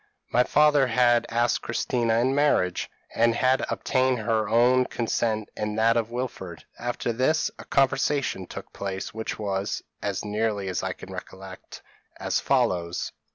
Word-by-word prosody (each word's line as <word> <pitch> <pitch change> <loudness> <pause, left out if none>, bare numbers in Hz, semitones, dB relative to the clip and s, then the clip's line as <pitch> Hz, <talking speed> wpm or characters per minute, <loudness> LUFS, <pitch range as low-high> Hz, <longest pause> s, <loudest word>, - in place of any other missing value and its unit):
My 125 - +4
father 150 -1 +4
had 120 0 +3
asked 120 +1 +1
Christina 115 -1 0
in 125 +3 +2
marriage, 140 -11 +1 0.2
and 115 0 +3
had 130 +2 +2
obtained 130 -1 +1
both 110 - -6
her 110 -2 +1
own 125 +3 +4
consent 110 -3 -1
and 105 0 -3
that 115 +1 +4
of 115 -1 0
Wilfred; 115 -9 -5 0.2
after 120 0 -2
this, 130 +7 +1
a - - -9
conversation 135 -6 +1
took - - -9
place, 95 -1 -5
which 110 0 -4
was, 100 -2 -2 0.2
as - - -3
nearly 105 -2 -1
as 90 - -2
I - - -2
can - - -11
recollect, 95 0 -10 0.4
as - - 0
follows. 85 -1 0
115 Hz, 155 wpm, -26 LUFS, 105-125 Hz, 0.4 s, My